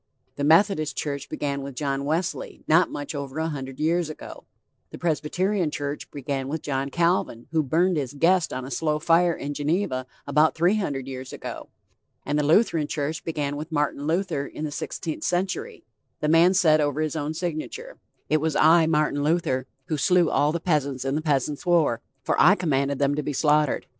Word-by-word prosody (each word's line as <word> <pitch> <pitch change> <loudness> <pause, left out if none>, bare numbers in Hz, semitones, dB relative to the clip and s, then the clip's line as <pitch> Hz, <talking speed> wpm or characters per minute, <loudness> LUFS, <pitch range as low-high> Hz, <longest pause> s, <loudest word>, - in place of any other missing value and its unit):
The 140 - -3
Methodist 155 -2 +3
church 140 -2 -3
began 140 -1 -3
with 135 -1 -7
John 140 0 -2
Wesley 165 +4 -2
not 165 +3 +4
much 145 +2 -5
over 140 -1 -5
a 160 +1 -1
hundred 135 -3 -6
years 165 +1 +1
ago; 155 - -9 0.4
the - - -9
Presbyterian 175 +3 0
church 145 0 -5
began 135 -1 -4
with 155 +2 -4
John 135 -1 -2
Calvin 170 -7 0
who 160 -1 +2
burned 170 +5 +1
his 140 -1 -3
guest 175 +4 +3
on 130 0 -4
a 135 - -8
slow 150 +2 0
fire 170 +2 +3
in 145 +1 -5
Geneva 145 -3 -1 0.2
about 150 +2 +3
three 175 +6 +3
hundred 140 -10 -2
years 130 -1 -7
ago; - - -7 0.6
and 145 +1 0
the - - +1
Lutheran 160 -1 +3
church 150 +1 -3
began 145 -3 -2
with 155 +3 -6
Martin 145 -1 -1
Luther 165 -4 -1
in 155 - -6
the 150 - -4
sixteenth 155 +2 -5
century, 180 +1 -2 0.4
the 150 - -1
man 165 +3 +6
who - - +1
said 155 -4 +4
over 145 0 0
his 155 0 -1
own 155 0 -3
signature: 175 - -5 0.3
"It 155 - +3
was 160 -1 0
I, 160 +1 +5
Martin 150 -2 +1
Luther, 145 -5 0 0.2
who 155 - -2
slew 175 +2 +3
all 145 +1 +2
the 170 - -2
peasants 140 -6 -1
in 135 - 0
the 155 - 0
Peasants 145 -2 0
War, 165 -10 +2 0.2
for - - +1
I 185 +5 +7
commanded 140 -6 0
them 140 0 +2
to 150 - -1
be 145 0 -3
slaughtered.... 150 0 +2
150 Hz, 195 wpm, -25 LUFS, 140-165 Hz, 0.6 s, I